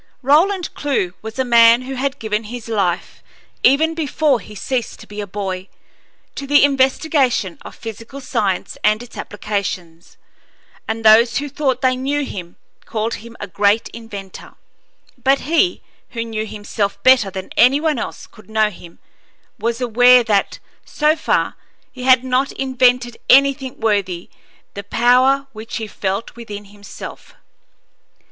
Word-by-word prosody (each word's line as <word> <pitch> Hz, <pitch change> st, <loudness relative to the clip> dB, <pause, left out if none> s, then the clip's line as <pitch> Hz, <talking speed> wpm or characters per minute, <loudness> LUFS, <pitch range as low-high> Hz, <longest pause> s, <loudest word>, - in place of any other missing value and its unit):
Roland 340 Hz, +7 st, +2 dB
Clewe 265 Hz, -11 st, -1 dB
was 220 Hz, +2 st, -8 dB
a 260 Hz, -, 0 dB
man 235 Hz, 0 st, +6 dB
who 265 Hz, +1 st, -6 dB
had 270 Hz, +2 st, -2 dB
given 215 Hz, -1 st, -2 dB
his 235 Hz, +1 st, -8 dB
life, 195 Hz, -5 st, -2 dB, 0.4 s
even 310 Hz, +5 st, +4 dB
before 305 Hz, -4 st, +1 dB
he 210 Hz, 0 st, -12 dB
ceased 245 Hz, +3 st, -3 dB
to -, -, -12 dB
be 210 Hz, 0 st, -7 dB
a 205 Hz, -, -6 dB
boy, 190 Hz, -1 st, -4 dB, 0.7 s
to 275 Hz, -, -6 dB
the 290 Hz, 0 st, +5 dB
investigation 265 Hz, -, +1 dB
of -, -, -11 dB
physical 230 Hz, +4 st, -9 dB
science 195 Hz, -8 st, -2 dB
and 215 Hz, +2 st, +2 dB
its 245 Hz, -, -14 dB
applications, 200 Hz, -5 st, -5 dB, 0.7 s
and 225 Hz, 0 st, -4 dB
those 230 Hz, +2 st, +6 dB
who 290 Hz, +2 st, -2 dB
thought 280 Hz, -2 st, -1 dB
they 255 Hz, -1 st, +2 dB
knew 280 Hz, +3 st, -1 dB
him 175 Hz, -7 st, -8 dB, 0.3 s
called 225 Hz, +1 st, -2 dB
him 230 Hz, +1 st, -9 dB
a -, -, -4 dB
great 205 Hz, +3 st, +1 dB
inventor; 205 Hz, -5 st, -10 dB, 0.7 s
but 275 Hz, +1 st, +3 dB
he, 335 Hz, +4 st, +1 dB, 0.3 s
who 230 Hz, -1 st, -3 dB
knew 220 Hz, -1 st, -4 dB
himself 205 Hz, -1 st, -3 dB
better 255 Hz, -6 st, +5 dB
than 190 Hz, -1 st, -7 dB
any 255 Hz, +4 st, +5 dB
one 305 Hz, -5 st, 0 dB
else -, -, -6 dB
could 215 Hz, -, -19 dB
know 215 Hz, -1 st, +2 dB
him, 175 Hz, -2 st, -14 dB, 0.6 s
was 230 Hz, +1 st, -1 dB
aware 245 Hz, +1 st, +6 dB
that, 205 Hz, -4 st, 0 dB, 0.3 s
so 305 Hz, +1 st, +1 dB
far, 320 Hz, -, 0 dB, 0.4 s
he 255 Hz, -, -11 dB
had 255 Hz, -1 st, +5 dB
not 260 Hz, +2 st, 0 dB
invented 250 Hz, -2 st, +1 dB
anything 275 Hz, 0 st, +4 dB
worthy 195 Hz, -6 st, -1 dB, 0.4 s
the 200 Hz, -, -7 dB
power 255 Hz, +6 st, +3 dB
which 220 Hz, +1 st, -7 dB
he 225 Hz, -, -4 dB
felt 200 Hz, 0 st, -4 dB
within 210 Hz, -3 st, -8 dB
himself. 205 Hz, 0 st, -11 dB
235 Hz, 150 wpm, -19 LUFS, 210-265 Hz, 0.7 s, man